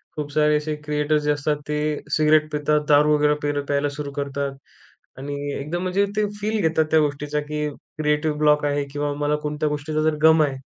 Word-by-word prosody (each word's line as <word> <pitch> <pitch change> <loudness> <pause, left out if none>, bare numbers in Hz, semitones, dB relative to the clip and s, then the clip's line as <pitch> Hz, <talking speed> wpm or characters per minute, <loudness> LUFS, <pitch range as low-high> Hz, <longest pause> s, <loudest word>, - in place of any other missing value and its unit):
खूप 145 -1 -4
सारे 150 0 +3
असे 150 +1 -3
क्रिएटर्स 150 0 +1
जे 150 - +2
असतात 145 +1 0
ते 150 - 0 0.4
सिगरेट 155 0 +3
पितात, 150 0 +1
दारू 150 +1 +5
वगैरे 150 0 +3
पेल 145 0 0
प्यायला 145 0 +1
सुरू 145 -1 -5
करतात 140 -1 -3 0.6
आणि 145 +2 -5 0.2
एकदम 155 +6 -3
म्हणजे 185 +2 +1
ते 215 - +3
फील 215 +1 -1
घेतात 160 -1 +2
त्या 160 - +5
गोष्टीचा 150 0 -1
की 150 0 -3 0.3
क्रिएटिव्ह 150 0 0
ब्लॉक 150 -1 +3
आहे 145 0 0
किंवा 145 0 -1
मला 145 0 +2
कोणत्या 150 +1 -1
गोष्टीचा 150 +1 -2
जर 155 0 +2
गम 160 0 +7
आहे 140 -2 -1
150 Hz, 190 wpm, -23 LUFS, 145-155 Hz, 0.6 s, गम